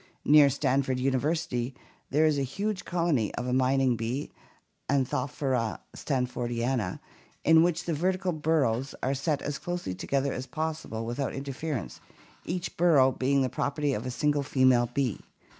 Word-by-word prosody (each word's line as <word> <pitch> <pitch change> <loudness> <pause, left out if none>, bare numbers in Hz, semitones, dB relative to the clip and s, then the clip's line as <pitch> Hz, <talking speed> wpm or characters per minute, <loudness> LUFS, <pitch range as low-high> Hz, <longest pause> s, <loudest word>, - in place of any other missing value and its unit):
Near 145 -1 +7
Stanford 135 -1 0
University 130 -1 -1 0.3
there 155 +3 +3
is 150 -2 +2
a - - 0
huge 195 +8 -3
colony 165 - +1
of - - -3
a 125 - -1
mining 130 -1 +3
bee, 120 +6 -3 0.6
Anthophora 130 -3 0 0.2
stanfordiana, 120 -5 -1 0.4
in 160 0 +6
which 175 0 +1
the 170 - -2
vertical 185 +3 0
burrows 145 -6 0
are 130 - +1
set 140 +2 -1
as 145 -1 -3
closely 175 - -4
together 135 +8 -1
as 130 +1 -5
possible 155 -8 -4
without 120 +4 -3
interference, 135 -1 -4 0.4
each 175 0 -4
burrow 150 -7 +5
being 135 +2 +1
the - - +1
property 145 +2 -1
of 115 +2 -3
a - - -2
single 145 +3 +1
female 130 -3 +3
bee. 130 -5 -1
135 Hz, 145 wpm, -28 LUFS, 125-155 Hz, 0.6 s, Near